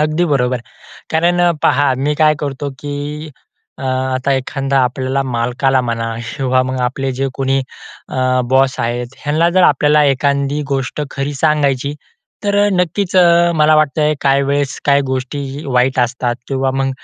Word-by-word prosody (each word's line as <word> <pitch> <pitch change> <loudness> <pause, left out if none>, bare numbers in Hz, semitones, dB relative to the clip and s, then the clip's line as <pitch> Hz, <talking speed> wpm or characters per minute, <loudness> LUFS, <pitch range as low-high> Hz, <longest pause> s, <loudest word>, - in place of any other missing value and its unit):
अगदी 155 +3 +1
बरोबर. 125 -2 +1 0.5
कारण 175 +2 +2 0.2
पहा, 140 -1 +3
मी 140 +3 -1
काय 155 0 +3
करतो, 140 0 -3
की 145 +2 -6 0.5
अ, - - -9
आता 130 +1 -1
एखादा 135 +1 -1
आपल्याला 130 +2 -1
मालकाला 125 +1 0
म्हणा 115 -2 -3 0.2
किंवा 130 -2 +1
मग 130 0 -3
आपले 130 +2 -1
जे 135 +2 -2
कोणी 135 0 0 0.5
अ, - - -4 0.3
बॉस 130 0 +2
आहेत, 120 +2 -3
ह्यांना 155 +3 +2
जर 185 - +5
आपल्याला 150 +2 +3
एखादी 140 +1 0
गोष्ट 135 +1 -2
खरी 140 +1 -3
सांगायची. 145 -2 +1 0.5
तर 200 0 +1 0.2
नक्कीच 180 +1 -1
अ, 170 -1 +5
मला 155 0 +4
वाटतंय 155 0 +2
काही 140 0 +2
वेळेस 140 0 -1
काही 140 -1 +4
गोष्टीही 135 +2 -4
वाईट 130 -1 +1
असतात 120 0 0
किंवा 135 -1 0
मग 135 0 0
135 Hz, 150 wpm, -16 LUFS, 130-150 Hz, 0.5 s, जर